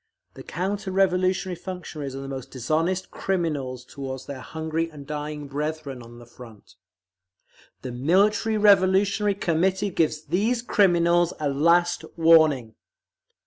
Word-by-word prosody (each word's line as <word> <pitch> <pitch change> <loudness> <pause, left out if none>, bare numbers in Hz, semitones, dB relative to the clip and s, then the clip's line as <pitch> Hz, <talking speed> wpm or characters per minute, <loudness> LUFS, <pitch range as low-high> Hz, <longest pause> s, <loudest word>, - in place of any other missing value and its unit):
The - - -11
counter 195 +4 -3
revolutionary 185 -1 +1
functionaries 165 -7 -7
are 135 - -6
the 135 - -7
most 135 -2 -6
dishonest 160 +9 -1
criminals 145 -9 -2
toward 135 -1 -7
their 140 -2 -7
hungry 160 +3 -3
and 145 -3 -11
dying 150 0 -5
brethren 145 -2 -4
on 120 0 -13
the 120 - -13
Front…. 115 -3 -15 1.1
The 125 - -5
MILITARY 195 - +2
REVOLUTIONARY 200 0 +3
COMMITTEE 190 +2 0
GIVES 155 -2 0
THESE 230 +6 0
CRIMINALS 175 -5 +3
A 150 -2 0
LAST 170 +5 +2
WARNING. 155 -8 +4
165 Hz, 125 wpm, -24 LUFS, 140-185 Hz, 1.1 s, WARNING